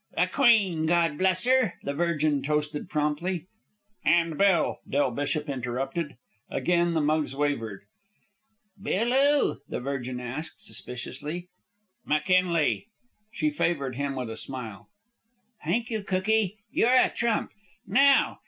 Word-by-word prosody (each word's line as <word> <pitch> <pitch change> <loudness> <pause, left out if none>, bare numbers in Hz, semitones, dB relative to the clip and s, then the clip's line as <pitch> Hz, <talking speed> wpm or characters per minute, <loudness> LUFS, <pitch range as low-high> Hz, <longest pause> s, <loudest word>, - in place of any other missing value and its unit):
"The - - +4
Queen, 200 - +3
Gawd 165 -3 +2
bless 185 +1 +2
'er!" 255 -6 +3
the 140 - -2
Virgin 155 -2 +1
toasted 150 +2 -2
promptly. 155 +3 -1 0.6
"And 165 0 +3
Bill!" 190 -2 +2
Del 140 -2 +1
Bishop 145 +4 -2
interrupted. 135 +3 -3 0.3
Again 175 -1 +1
the 160 - +2
mugs 150 -2 0
wavered. 115 -9 -2 1.0
"Bill 230 +3 0
'oo?" 285 +2 +3
the - - -3
Virgin 130 -1 -4
asked, 125 +6 -5
suspiciously. 150 +8 -6 0.5
"McKinley." 175 +2 +1 0.4
She 305 +6 0
favored 140 - -1
him 140 0 -2
with 125 -3 -4
a 110 - -7
smile. 120 -6 -7 0.7
"Thank 235 +1 -1
you, 220 -2 -1
cookie, 200 +1 0
you're 235 - +2
a 255 0 +5
trump. 235 -2 -1 0.3
Now! 275 +1 +4
160 Hz, 125 wpm, -27 LUFS, 140-190 Hz, 1.0 s, a